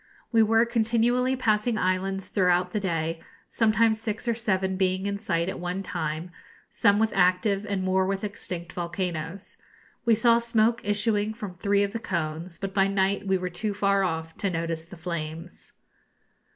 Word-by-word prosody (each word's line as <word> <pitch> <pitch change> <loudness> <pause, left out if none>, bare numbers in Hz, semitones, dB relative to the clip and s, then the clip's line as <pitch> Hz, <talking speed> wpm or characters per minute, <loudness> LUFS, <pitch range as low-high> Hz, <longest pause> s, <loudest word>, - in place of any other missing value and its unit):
We 230 -2 +5
were 225 +1 +4
continually 235 +2 +2
passing 220 -2 +1
islands 190 0 -1
throughout 180 -2 +2
the 210 - -1
day, 165 -4 -2 0.3
sometimes 220 0 +2
six 225 +1 -3
or 235 - +3
seven 190 -4 0
being 185 0 0
in 200 0 -2
sight 170 -5 0
at 190 - -4
one 180 +2 -3
time, 160 0 -4 0.4
some 205 -2 +3
with 220 +1 +1
active 195 +3 +2
and 200 -2 -1
more 185 0 +2
with 195 +1 -2
extinct 180 -4 -5
volcanoes. 175 0 -4 0.5
We 230 -2 +4
saw 235 +1 +4
smoke 235 0 +2
issuing 210 +1 0
from 210 -5 -6
three 200 +3 +1
of 200 0 -2
the 230 - -2
cones, 170 -3 -3
but 195 -1 -5
by 195 -1 +3
night 195 0 0
we 190 0 +3
were 180 0 -4
too 205 +4 -2
far 200 -1 +2
off 160 -2 -3
to 200 - -1
notice 165 -2 -3
the 185 +2 -12
flames. 165 0 -6
195 Hz, 170 wpm, -26 LUFS, 180-215 Hz, 0.5 s, We